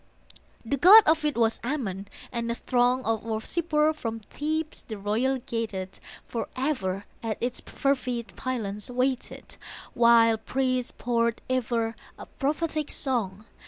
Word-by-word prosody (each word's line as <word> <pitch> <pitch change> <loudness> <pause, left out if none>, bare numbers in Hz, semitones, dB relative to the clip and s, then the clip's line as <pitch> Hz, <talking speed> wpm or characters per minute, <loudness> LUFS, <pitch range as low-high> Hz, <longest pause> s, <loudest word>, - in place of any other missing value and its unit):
The 280 +5 0
god 400 +9 +10
of 315 0 +3
it 295 -5 0
was 225 -1 +2
Ammon, 215 -8 -3 0.2
and 235 -2 -2
a 235 - 0
throng 250 +1 +1
Of 225 -1 0
worshippers 300 +8 0
from 225 -5 -4
Thebes 310 +7 -3
the 220 - -7
royal 225 +7 0
gated 225 -6 -4 0.3
Forever 230 -6 -2 0.2
at 225 -2 -3
its 245 +1 -2
fervid 250 -4 -2
pylons 210 -5 -4
waited 255 +1 -2 0.4
While 230 -1 +5
priests 255 +1 -1
poured 235 -1 -1
ever 230 -2 0 0.2
a - - -9
prophetic 305 +1 -2
song. 215 -6 -2
240 Hz, 125 wpm, -27 LUFS, 225-270 Hz, 0.4 s, god